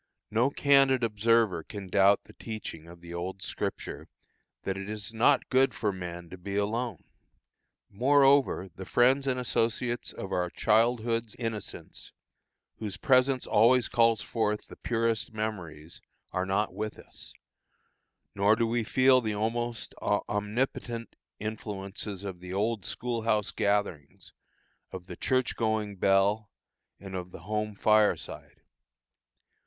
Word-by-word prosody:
No 115 Hz, +5 st, +3 dB
candid 135 Hz, -3 st, +4 dB
observer 110 Hz, -4 st, +2 dB
can 100 Hz, +3 st, -8 dB
doubt 100 Hz, +2 st, +4 dB
the -, -, -17 dB
teaching 105 Hz, -8 st, -7 dB
of 85 Hz, 0 st, -13 dB
the 85 Hz, 0 st, -9 dB
old 90 Hz, +2 st, -5 dB
scripture, -, -, -4 dB, 0.6 s
that 95 Hz, -, -2 dB
"it 95 Hz, +1 st, -6 dB
is 105 Hz, 0 st, -5 dB
not 125 Hz, +5 st, +3 dB
good 130 Hz, +1 st, +3 dB
for 105 Hz, -3 st, 0 dB
man 90 Hz, -2 st, -7 dB
to 95 Hz, -, -9 dB
be 100 Hz, +2 st, -5 dB
alone." 115 Hz, +4 st, -1 dB, 0.8 s
Moreover, 135 Hz, -1 st, +3 dB
the 95 Hz, -, -7 dB
friends 130 Hz, +3 st, +3 dB
and 130 Hz, -1 st, +1 dB
associates 120 Hz, 0 st, -1 dB
of 95 Hz, -, -7 dB
our 90 Hz, -1 st, 0 dB
childhood's 115 Hz, +1 st, +1 dB
innocence, 115 Hz, -4 st, -6 dB, 0.7 s
whose 105 Hz, -2 st, -5 dB
presence 130 Hz, +3 st, +3 dB
always 120 Hz, +3 st, +4 dB
calls 115 Hz, -2 st, +3 dB
forth 105 Hz, -2 st, -1 dB
the -, -, -10 dB
purest 115 Hz, -1 st, -1 dB
memories, 85 Hz, -8 st, -5 dB, 0.3 s
are 95 Hz, 0 st, -1 dB
not 100 Hz, 0 st, 0 dB
with 110 Hz, +2 st, -4 dB
us; -, -, -11 dB, 1.0 s
nor 100 Hz, +2 st, +4 dB
do 115 Hz, +1 st, +1 dB
we 115 Hz, 0 st, 0 dB
feel 130 Hz, +3 st, +4 dB
the 110 Hz, -3 st, -2 dB
almost 115 Hz, +2 st, -2 dB
omnipotent 115 Hz, +3 st, -2 dB, 0.2 s
influences 100 Hz, -2 st, -5 dB
of 95 Hz, -3 st, -6 dB
the 90 Hz, 0 st, -9 dB
old 105 Hz, 0 st, -1 dB
school 120 Hz, -1 st, -2 dB
house 105 Hz, -2 st, +1 dB
gatherings, 100 Hz, -8 st, -2 dB, 0.6 s
of 95 Hz, -1 st, -7 dB
the -, -, -8 dB
church 130 Hz, -1 st, 0 dB
going 110 Hz, -2 st, -1 dB
bell, 100 Hz, +3 st, +2 dB, 0.5 s
and 95 Hz, -1 st, -9 dB
of 90 Hz, -1 st, -5 dB
the 85 Hz, -, -11 dB
home 105 Hz, +3 st, -3 dB
fireside. 105 Hz, +1 st, +1 dB
110 Hz, 135 wpm, -29 LUFS, 95-120 Hz, 1.0 s, candid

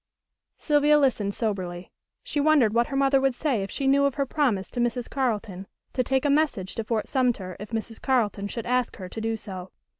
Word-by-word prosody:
Sylvia 295 Hz, 0 st, +4 dB
listened 225 Hz, -8 st, +1 dB
soberly. 185 Hz, -5 st, -3 dB, 0.3 s
She 295 Hz, -, -2 dB
wondered 285 Hz, -7 st, +4 dB
what 235 Hz, +1 st, +2 dB
her 275 Hz, -, -5 dB
mother 275 Hz, 0 st, +3 dB
would 270 Hz, -2 st, +1 dB
say 260 Hz, -6 st, 0 dB
if 195 Hz, -, -4 dB
she 275 Hz, -, -3 dB
knew 280 Hz, +1 st, +4 dB
of 280 Hz, -, 0 dB
her 280 Hz, -2 st, 0 dB
promise 250 Hz, -9 st, 0 dB
to 245 Hz, -, -4 dB
Mrs. 240 Hz, 0 st, 0 dB
Carleton 210 Hz, -8 st, -2 dB, 0.3 s
to 255 Hz, -, +1 dB
take 265 Hz, +3 st, 0 dB
a -, -, +3 dB
message 280 Hz, -11 st, +1 dB
to 225 Hz, -, -3 dB
Fort 220 Hz, 0 st, -2 dB
Sumter 240 Hz, -9 st, 0 dB
if 210 Hz, +1 st, -8 dB
Mrs. 225 Hz, 0 st, -5 dB
Carleton 215 Hz, -6 st, +1 dB
should 230 Hz, +2 st, -5 dB
ask 250 Hz, 0 st, 0 dB
her 185 Hz, -3 st, -7 dB
to 220 Hz, -, -6 dB
do 225 Hz, 0 st, -1 dB
so. 190 Hz, -3 st, -8 dB
240 Hz, 210 wpm, -26 LUFS, 205-275 Hz, 0.3 s, Sylvia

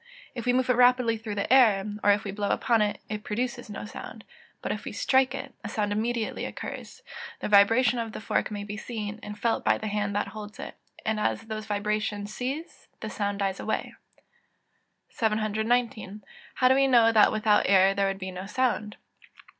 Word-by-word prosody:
If 240 Hz, 0 st, -6 dB
we 245 Hz, -, +4 dB
move 255 Hz, 0 st, +2 dB
it 250 Hz, -, +4 dB
rapidly 250 Hz, -2 st, +4 dB
through 220 Hz, -2 st, -6 dB
the 205 Hz, +5 st, 0 dB
air, 215 Hz, -7 st, +5 dB, 0.2 s
or -, -, +4 dB
if 205 Hz, +1 st, +4 dB
we 200 Hz, -, -4 dB
blow 205 Hz, 0 st, -2 dB
upon 230 Hz, -2 st, +2 dB
it, 210 Hz, -1 st, 0 dB
it 210 Hz, 0 st, -5 dB
produces 240 Hz, +2 st, -3 dB
no 205 Hz, -, -6 dB
sound; -, -, -9 dB, 0.4 s
but -, -, -2 dB
if -, -, -4 dB
we -, -, -5 dB
strike 265 Hz, 0 st, +2 dB
it, 270 Hz, -1 st, -7 dB
a 205 Hz, -, -5 dB
sound 205 Hz, -1 st, -1 dB
immediately 225 Hz, +2 st, -2 dB
occurs; -, -, -8 dB, 0.4 s
the -, -, -3 dB
vibration 225 Hz, +5 st, +5 dB
of 225 Hz, -1 st, -3 dB
the -, -, -7 dB
fork 220 Hz, -, -1 dB
may 205 Hz, -1 st, -5 dB
be 205 Hz, +1 st, -6 dB
seen, 215 Hz, -2 st, -5 dB
and 210 Hz, 0 st, -8 dB
felt 230 Hz, +2 st, 0 dB
by -, -, +3 dB
the -, -, -7 dB
hand 205 Hz, -1 st, -2 dB
that 205 Hz, -, -1 dB
holds 210 Hz, 0 st, -9 dB
it; -, -, -8 dB, 0.3 s
and 220 Hz, -1 st, 0 dB
as 210 Hz, -, -1 dB
those 220 Hz, -1 st, -6 dB
vibrations 210 Hz, 0 st, -2 dB
cease, 275 Hz, +8 st, -5 dB
the 220 Hz, -, -5 dB
sound 205 Hz, -1 st, -2 dB
dies 195 Hz, -1 st, -1 dB
away. 220 Hz, -, -3 dB, 1.2 s
719. 220 Hz, -1 st, -1 dB, 0.4 s
_How 255 Hz, -, +5 dB
do -, -, +6 dB
we 275 Hz, +1 st, +4 dB
know 235 Hz, -3 st, +5 dB
that 215 Hz, -2 st, +5 dB
without 215 Hz, -1 st, +2 dB
air 195 Hz, 0 st, +5 dB
there 195 Hz, 0 st, +1 dB
would 195 Hz, 0 st, -2 dB
be 190 Hz, -1 st, -6 dB
no 185 Hz, +1 st, -7 dB
sound? 215 Hz, -3 st, -1 dB
215 Hz, 200 wpm, -27 LUFS, 205-240 Hz, 1.2 s, do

